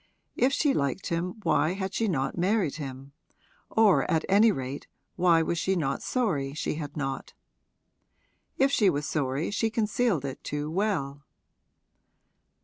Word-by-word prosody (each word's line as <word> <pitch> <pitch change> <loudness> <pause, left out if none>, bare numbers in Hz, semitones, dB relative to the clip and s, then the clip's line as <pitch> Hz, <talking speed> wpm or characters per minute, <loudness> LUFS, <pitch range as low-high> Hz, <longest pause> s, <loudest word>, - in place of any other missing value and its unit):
If 255 +2 +3
she 280 0 +2
liked 140 +7 -1
him 170 +1 -2
why 155 0 +2
had 190 0 -4
she 225 - 0
not 135 -8 -1
married 180 -4 +1
him 135 -2 -7 0.6
or 220 -4 +4
at 160 - +1
any 210 +3 +5
rate 135 -3 -5 0.3
why 170 -2 +4
was 170 +1 -1
she 190 +3 +1
not 140 -6 -1
sorry 150 - -1
she - - -2
had 150 -2 -6
not? 135 -2 -4 1.2
If 270 +1 +3
she 210 -7 +4
was 145 -3 -1
sorry 140 +2 -1
she 225 +2 0
concealed 220 - 0
it 135 - -6
too 150 +1 -3
well. 160 -8 -1
165 Hz, 145 wpm, -27 LUFS, 140-205 Hz, 1.2 s, any